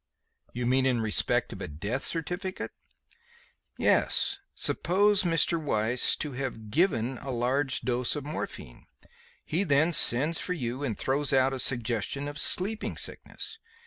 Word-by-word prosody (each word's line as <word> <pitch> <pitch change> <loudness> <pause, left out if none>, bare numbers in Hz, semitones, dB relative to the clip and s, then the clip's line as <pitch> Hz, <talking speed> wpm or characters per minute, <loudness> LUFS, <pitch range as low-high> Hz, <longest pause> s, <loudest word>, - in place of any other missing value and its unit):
"You 125 0 -4
mean 130 +2 +2
in 125 -2 +1
respect 110 -2 0
of - - -10
a - - -4
death 100 - -4
certificate?" 180 +5 -3 1.1
"Yes. - - +2 0.2
Suppose 200 +3 +2
Mr. 170 -1 +2
Weiss 120 -3 +1
to 150 - -5
have 125 -5 -6
given 135 - +1
a 135 - -8
large 130 +2 0
dose 125 +1 -1
of 145 -2 -5
morphine. 145 - -7 0.6
He 175 +5 0
then 155 +1 +2
sends 150 +4 +5
for 180 - -2
you 130 -4 -4
and 115 -7 -3
throws 140 +2 +1
out 135 0 +3
a 130 - -3
suggestion 120 +3 +2
of 145 +1 -6
sleeping 210 +8 0
sickness. 450 - -5
135 Hz, 145 wpm, -28 LUFS, 120-165 Hz, 1.1 s, sends